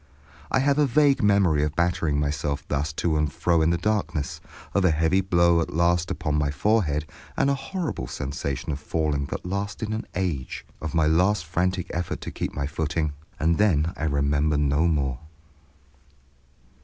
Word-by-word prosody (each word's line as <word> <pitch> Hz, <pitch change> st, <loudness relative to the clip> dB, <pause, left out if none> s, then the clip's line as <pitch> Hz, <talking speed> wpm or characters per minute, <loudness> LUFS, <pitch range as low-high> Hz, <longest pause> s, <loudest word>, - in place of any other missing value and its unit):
I -, -, +2 dB
have 140 Hz, +2 st, +2 dB
a 145 Hz, -, +4 dB
vague 140 Hz, +2 st, +3 dB
memory 100 Hz, -7 st, +3 dB
of 75 Hz, +1 st, -2 dB
battering 85 Hz, -4 st, +1 dB
myself 70 Hz, 0 st, -2 dB
thus 75 Hz, +2 st, -1 dB
to 80 Hz, 0 st, 0 dB
and 75 Hz, -2 st, 0 dB
fro 85 Hz, -2 st, +1 dB
in 80 Hz, -, +3 dB
the 85 Hz, -, +2 dB
darkness, 85 Hz, -6 st, -1 dB, 0.3 s
of 100 Hz, -, +2 dB
a 90 Hz, -, +5 dB
heavy 80 Hz, +4 st, +2 dB
blow 85 Hz, -2 st, +3 dB
at 80 Hz, -, -4 dB
last 85 Hz, +1 st, +2 dB
upon 75 Hz, 0 st, -1 dB
my 70 Hz, -1 st, +1 dB
forehead, 75 Hz, -2 st, +1 dB, 0.3 s
of -, -, +3 dB
a -, -, +3 dB
horrible 160 Hz, +5 st, -4 dB
sensation 70 Hz, +2 st, -4 dB
of 70 Hz, -, -3 dB
falling 75 Hz, -2 st, -1 dB
that -, -, -5 dB
lasted 100 Hz, +3 st, -3 dB
an 110 Hz, +1 st, -3 dB
age, 85 Hz, -8 st, -3 dB, 0.2 s
of 80 Hz, +1 st, -4 dB
my 80 Hz, -1 st, +3 dB
last 90 Hz, +4 st, +2 dB
frantic 90 Hz, +2 st, 0 dB
effort 85 Hz, +1 st, -3 dB
to -, -, -6 dB
keep -, -, -4 dB
my 70 Hz, -, -1 dB
footing, 75 Hz, +1 st, -2 dB, 0.3 s
and 80 Hz, +3 st, +2 dB
then 85 Hz, -6 st, +2 dB
I 80 Hz, -, -3 dB
remember 70 Hz, +1 st, +1 dB
no 75 Hz, +3 st, +2 dB
more. 70 Hz, -6 st, 0 dB
80 Hz, 175 wpm, -25 LUFS, 75-95 Hz, 0.3 s, a